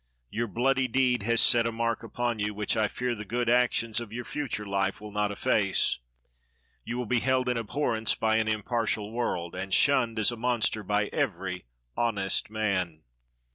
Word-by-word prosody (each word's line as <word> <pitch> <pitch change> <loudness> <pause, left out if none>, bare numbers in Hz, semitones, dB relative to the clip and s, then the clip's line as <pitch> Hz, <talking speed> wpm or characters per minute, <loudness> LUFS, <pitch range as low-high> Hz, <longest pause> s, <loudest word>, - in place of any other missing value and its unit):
Your 120 +1 -1
bloody 130 +5 +1
deed 125 -1 +2
has 115 -1 +5
set 115 -1 +6
a - - -1
mark 115 0 -1
upon 120 0 -2
you, 105 0 -2
which 105 0 -1
I 110 -1 +2
fear 125 +3 -2
the 105 -2 -6
good 120 +3 -2
actions 120 -2 +2
of 120 -3 -7
your 120 +1 -5
future 130 -8 -4
life 100 -1 -1
will 105 0 -9
not 105 0 0
efface. 100 - +1 0.8
You 120 - -4
will 125 - -2
be 120 +2 +1
held 130 +1 +1
in 125 - +1
abhorrence 115 -1 0
by 110 0 +1
an 110 -1 +1
impartial 110 -1 -1
world, 90 -8 -2
and 95 +1 -5
shunned 120 -1 +3
as 110 +2 +3
a 120 - -6
monster 120 -2 0
by 105 +1 0
every 95 - -2 0.3
honest 100 -5 +1
man. 95 -7 -2
115 Hz, 180 wpm, -28 LUFS, 105-120 Hz, 0.8 s, set